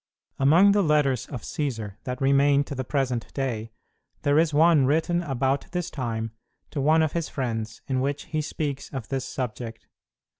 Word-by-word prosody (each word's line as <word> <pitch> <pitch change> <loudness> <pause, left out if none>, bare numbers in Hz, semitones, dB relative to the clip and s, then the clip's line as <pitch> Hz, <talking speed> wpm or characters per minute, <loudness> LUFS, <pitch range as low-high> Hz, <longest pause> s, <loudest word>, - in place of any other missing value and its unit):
Among 165 +9 +6
the 205 0 +3
letters 150 - +2
of 125 -6 -7
Cćsar 115 -9 -3
that 125 0 -3
remain 140 +1 +4
to 145 - -7
the 130 -1 -3
present 125 -3 -1
day, 115 -5 -2 0.5
there 145 +1 +4
is 160 -1 +3
one 155 -2 +5
written 165 +4 +2
about 135 -3 -1
this 180 -2 -2
time 115 -4 -3 0.4
to 145 - -2
one 160 +3 +4
of 155 - 0
his 170 -2 -2
friends, 115 -4 -4
in 130 -1 0
which 140 +2 -1
he 155 -1 -2
speaks 145 -2 -4
of 130 -6 -6
this 135 -2 -2
subject. 115 -2 -5
140 Hz, 175 wpm, -26 LUFS, 125-150 Hz, 0.5 s, Among